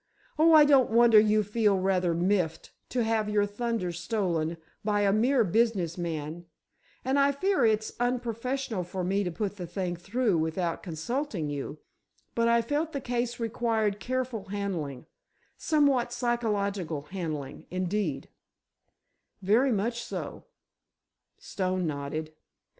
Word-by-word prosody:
"Oh, 325 +1 +6
I 305 -1 +9
don't 275 -4 +5
wonder 230 -1 +7
you 215 0 +3
feel 210 -1 +2
rather 185 -2 +1
miffed 175 -2 0 0.2
to 245 -2 0
have 220 -1 0
your 210 -1 +2
thunder 210 -3 -2
stolen 170 -2 -1 0.3
by 205 -1 +1
a 200 -1 +3
mere 240 +4 +3
business 200 -4 +1
man—and 170 - -5
I 280 0 +4
fear 370 +2 +1
it's 220 0 0
unprofessional 245 -2 -1
for 180 +1 -4
me 195 +3 +1
to 180 - -2
put 205 +3 -3
the 180 -2 -5
thing 180 0 -3
through 200 +1 0
without 165 +2 -1
consulting 180 - -3
you, 145 +1 -5 0.6
but 230 0 +2
I 235 0 +4
felt 300 +6 -1
the 280 - -2
case 240 -1 -2
required 225 -3 0
careful 255 -2 -3
handling—somewhat 205 - -2
psychological 205 - -1
handling, 155 -5 -5
indeed——" 180 -5 -2 1.2
"Very 235 +8 +4
much 230 +3 -1
so," - - -6 0.9
Stone 185 -1 -2
nodded. 155 +1 -4
205 Hz, 125 wpm, -28 LUFS, 175-240 Hz, 1.2 s, I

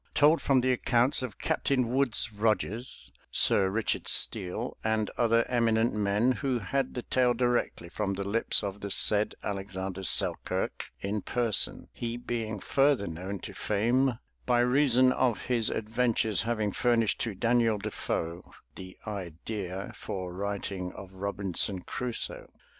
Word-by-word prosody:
Told 155 +2 +5
from 135 -2 +3
the 130 +1 +2
Accounts 125 +2 +3
of 125 -6 -5
Captain 130 -3 0
Woodes 125 -4 +1
Rogers, 110 +3 -1 0.2
Sir 95 - +4
Richard 110 +3 -1
Steele 100 +7 +2
and 110 -1 0
other 115 -1 +2
Eminent 115 -1 +2
Men, 105 +4 +2
who 130 -1 -1
had 130 +5 -2
the 125 - -3
Tale 125 -1 +2
directly 120 -7 0
from 100 +3 -2
the 100 - -3
Lips 105 +4 +2
of 100 0 -4
the 100 - -4
said 105 +2 +3
Alexander 95 -1 -4
Selkirk - - 0 0.2
in 100 +1 -2
Person, 120 -2 +1
he 120 0 -4
being 115 -3 -4
further 135 -1 +2
known 90 +4 -5
to - - -6
Fame 120 +4 +1 0.3
by 120 -1 +4
reason 130 0 +4
of 125 -4 0
his 120 -3 +1
Adventures 110 -1 0
having 110 -3 -1
furnished 115 0 +1
to 115 -4 -2
Daniel 115 0 +2
Defoe 90 -4 -4 0.2
the 95 0 -10
idea 95 0 -5
for 90 -2 -5
writing 100 -1 -4
of 95 -1 -11
Robinson 95 -1 -2
Crusoe. 125 +5 -4
110 Hz, 140 wpm, -29 LUFS, 100-120 Hz, 0.3 s, Told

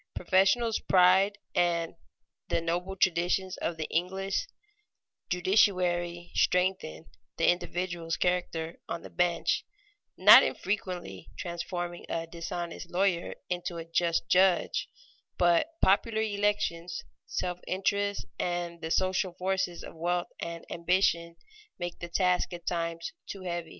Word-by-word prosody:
Professional 195 +6 +3 0.2
pride 190 +3 +5 0.2
and 170 -1 +1 0.6
the - - +2
noble 175 +3 -2
traditions 185 +1 +1
of 170 - -3
the 160 - -2
English 190 - -1 0.8
judiciary 180 -2 +2
strengthen 180 - +1 0.3
the - - +2
individual's 175 -1 -1
character 175 -2 -1
on - - -4
the - - -10
bench, 175 -1 +1 0.5
not - - +10
infrequently 180 - -3
transforming 175 0 -4
a 165 0 -2
dishonest 170 +1 -6
lawyer 180 -1 0
into 175 -1 -3
a 165 - -6
just 170 0 0
judge; 185 -1 +3 0.5
but 175 - +4 0.2
popular 220 +3 +3
elections, 200 -5 -1 0.2
selfish 180 0 -3
interests, 200 +2 0
and 175 -1 -2
the 160 - -4
social 185 +1 +1
forces 185 -1 -2
of - - -9
wealth 175 +2 -1
and 170 0 -6
ambition 170 -1 +1 0.4
make 175 -1 -5
the 170 - -6
task 180 0 +1
at 175 -1 -8
times 165 - -2
too 195 -2 -7
heavy. 175 -2 -4
175 Hz, 120 wpm, -29 LUFS, 170-185 Hz, 0.8 s, not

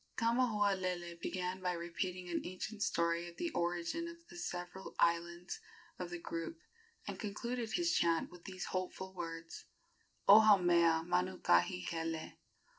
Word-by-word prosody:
Kamahualele 200 -7 +1
began 185 0 -2
by 180 -1 0
repeating 180 +1 -3
an 175 - -1
ancient 200 +4 -5
story 170 -2 +1
of 170 - -15
the 340 - -1
origin 175 - -1
of 335 0 -8
the - - -10
several 175 +2 -5
islands 170 +1 +1 0.4
of 180 -1 -3
the 175 - -4
group, 165 -1 -5 0.5
and - - -5
concluded 230 +2 -3
his 345 -1 +2
chant 165 -1 +2
with 175 -1 -14
these 185 -1 -5
hopeful 185 0 -3
words: 165 -2 -6 0.6
"O 205 +2 +11
Haumea 175 -6 +5
Manukahikele. 180 -2 +1
180 Hz, 130 wpm, -36 LUFS, 170-195 Hz, 0.6 s, O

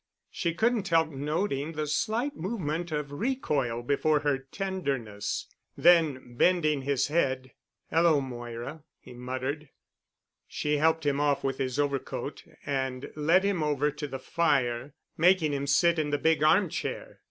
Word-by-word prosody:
She 170 -2 -2
couldn't 225 -1 +1
help 165 -2 +3
noting 150 +1 -2
the 155 -1 -2
slight 230 - -1
movement 175 -4 -3
of 150 -2 -3
recoil 145 - -1
before 145 +3 +2
her 145 -2 +1
tenderness. 135 - -3 0.3
Then, 155 -8 +4
bending 155 -5 +3
his 135 0 0
head, 130 -5 0 0.4
"Hello, 165 -2 +4
Moira," 120 +2 -6 0.2
he - - -13
muttered. 130 +4 -4 0.8
She 150 0 -1
helped 160 +1 +2
him 140 -1 +1
off 145 -1 +1
with 135 -1 -2
his 130 0 -2
overcoat 140 -2 -2 0.2
and 130 -2 -2
led 165 +5 +3
him 200 -4 0
over 150 -1 +1
to 150 +1 -5
the 135 -1 -5
fire, 130 -3 0 0.2
making 170 -3 +4
him 140 0 -2
sit 170 +4 +3
in 150 -1 0
the 145 - +1
big 160 +1 +2
arm 165 +6 +5
chair. - - -5
150 Hz, 145 wpm, -28 LUFS, 135-165 Hz, 0.8 s, arm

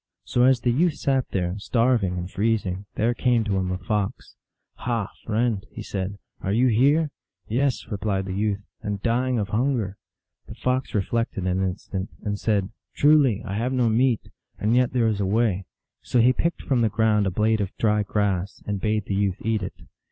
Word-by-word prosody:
So 125 0 +2
as 130 -2 +4
the 120 - +2
youth 160 +5 +2
sat 135 -2 0
there, 90 +1 -2
starving 115 -5 +1
and 90 0 -3
freezing, 100 -1 -1
there 115 +2 +2
came 120 -2 +2
to 100 -3 0
him 95 -1 -1
a 90 - -1
Fox. 105 +4 -3 0.2
" - - -57
Ha, 115 -5 -1
friend," 110 -2 0
he - - -8
said, 95 0 -4
" - - -39
are 95 - -1
you 125 +5 +3
here? 140 +7 +3
" - - -64
" - - -64
Yes," 130 +3 0
replied 100 -2 -1
the 95 - -4
youth, 100 0 -1
" - - -50
and 105 -1 -3
dying 125 +2 +1
of 100 -2 -1
hunger." 110 -4 0 0.5
The - - -9
Fox 130 -1 -1
reflected 105 -2 -1
an 90 +1 +1
instant, 95 0 -3
and 105 -1 -2
said, 100 -3 0
" - - -51
Truly 140 -7 +4
I 100 - -4
have 120 +5 -1
no 125 -3 +2
meat; 120 +1 +2 0.4
and 110 +3 +1
yet 125 0 +3
there 125 -2 +2
is 110 -2 +1
a 100 - +1
way." 100 -3 +1 0.4
So 125 - +1
he 125 +2 +5
picked 170 +6 -1
from 130 -3 +1
the 115 - +3
ground 105 -1 +2
a - - +2
blade 110 +3 +1
of 100 - -1
dry 105 -1 +2
grass, 100 -2 -1
and 100 -2 -3
bade 105 -1 0
the - - -3
youth 95 -2 +1
eat 110 -2 +1
it. 90 - -7
110 Hz, 210 wpm, -24 LUFS, 100-120 Hz, 0.5 s, he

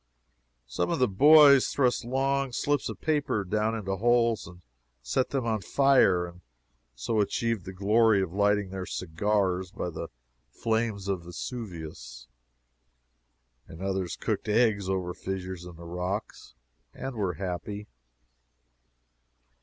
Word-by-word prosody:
Some 60 +9 -2
of - - 0
the 125 - +3
boys 140 +5 +7
thrust 125 -3 +1
long 135 +1 0
slips 145 +3 0
of - - -7
paper 145 -9 0
down 105 +4 0
into 95 -3 -3
holes 115 -1 +2
and 90 +1 -14 0.4
set 95 - 0
them 135 -3 -2
on 110 -2 0
fire, 135 -9 +3
and 85 +1 -12 0.5
so 110 - -1
achieved 110 -1 0
the 95 - -6
glory 105 +3 +3
of 90 -2 -6
lighting 100 -1 +1
their 95 -1 -5
cigars 95 +1 -1
by 90 - -5
the - - -6 0.4
flames 110 - -2
of 95 -4 -2
Vesuvius, 80 - -7 1.4
and 80 - -11
others 95 -2 -2
cooked - - -3
eggs 105 -3 +2
over 90 -2 -1
fissures 95 -2 -5
in 90 -1 -10
the 85 +1 -11
rocks 90 - -5 0.4
and 135 +1 -5
were 100 -5 -1
happy. 95 +4 -5
100 Hz, 130 wpm, -28 LUFS, 90-115 Hz, 1.4 s, boys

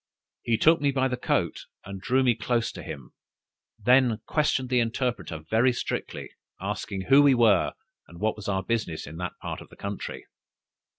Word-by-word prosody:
He 115 -1 +1
took 160 +4 +4
me 145 - +3
by 130 -1 +1
the 125 - -1
coat, 125 - -1 0.2
and 95 0 -7
drew 130 +5 +2
me 125 -2 +4
close 115 +1 -1
to - - -9
him; - - -8 0.7
then 125 +1 +4
questioned 140 -4 0
the 125 -1 +3
interpreter 120 -6 -2
very 115 +6 +3
strictly, 125 - -4 0.3
asking 95 - -4
who 135 +8 +6
we 140 -2 +6
were, 110 -6 +4 0.3
and 85 +3 -13
what 110 +2 0
was 105 - -8
our 95 -1 0
business 100 -7 -2
in 80 +2 -9
that 90 +1 -4
part - - -5
of - - -13
the - - -15
country. 100 0 -6
115 Hz, 180 wpm, -26 LUFS, 100-130 Hz, 0.7 s, who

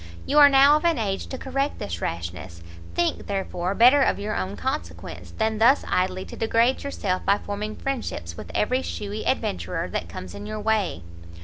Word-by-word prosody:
You 295 - +3
are 290 -1 +10
now 280 +2 +7
of 305 - -5
an 335 -3 +3
age 195 -4 -2
to 260 - -5
correct 275 +2 -2
this 85 -3 -5
rashness: 85 +1 -5 0.3
think, 175 - 0
therefore, 190 -1 -2
better 255 +6 +7
of - - +2
your 205 +1 -3
own 95 +1 -3
consequence, 85 0 -5
than 220 -1 0
thus 250 +6 +5
idly 185 +1 0
to - - -9
degrade 230 +3 +2
yourself 195 -10 -2
by 200 - +3
forming 210 +1 -5
friendships 225 - -4
with - - -9
every 255 +5 +1
shewy 210 -3 -5
adventurer 90 - -1
that - - -4
comes 90 - -8
in 205 - -8
your 215 0 -4
way." 210 - 0
205 Hz, 185 wpm, -24 LUFS, -, 0.3 s, are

